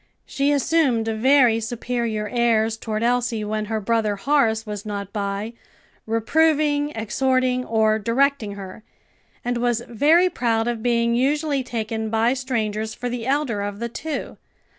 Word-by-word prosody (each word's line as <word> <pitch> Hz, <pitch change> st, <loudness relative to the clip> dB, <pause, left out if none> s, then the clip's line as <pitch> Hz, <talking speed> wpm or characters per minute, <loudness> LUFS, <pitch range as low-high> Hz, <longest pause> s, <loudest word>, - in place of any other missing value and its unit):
She 280 Hz, +1 st, 0 dB
assumed 280 Hz, -5 st, +2 dB
very 235 Hz, +1 st, +4 dB
superior 230 Hz, -1 st, -3 dB
airs 225 Hz, -2 st, +1 dB
toward 220 Hz, 0 st, -3 dB
Elsie 240 Hz, -2 st, 0 dB
when 215 Hz, 0 st, -2 dB
her 220 Hz, +1 st, -2 dB
brother 215 Hz, 0 st, 0 dB
Horace 225 Hz, -2 st, +1 dB
was 210 Hz, -1 st, -6 dB
not 200 Hz, -2 st, -5 dB
by, 200 Hz, +2 st, -3 dB, 0.5 s
reproving, 290 Hz, +5 st, +2 dB
exhorting, 255 Hz, +3 st, 0 dB
or 220 Hz, -1 st, +2 dB
directing 235 Hz, 0 st, +1 dB
her; 195 Hz, +1 st, -9 dB, 0.6 s
and 245 Hz, 0 st, 0 dB
was 240 Hz, -1 st, 0 dB
very 310 Hz, +10 st, +4 dB
proud 230 Hz, -9 st, 0 dB
of 235 Hz, -2 st, -2 dB
being 235 Hz, 0 st, +1 dB
usually 285 Hz, +3 st, +1 dB
taken 220 Hz, -2 st, -3 dB
by 225 Hz, +2 st, +2 dB
strangers 220 Hz, -4 st, -2 dB
for 245 Hz, -, -4 dB
the 240 Hz, -1 st, -4 dB
elder 270 Hz, -7 st, 0 dB
of 200 Hz, 0 st, -4 dB
the 235 Hz, +2 st, -4 dB
two. 300 Hz, +4 st, -5 dB
235 Hz, 140 wpm, -22 LUFS, 220-260 Hz, 0.6 s, very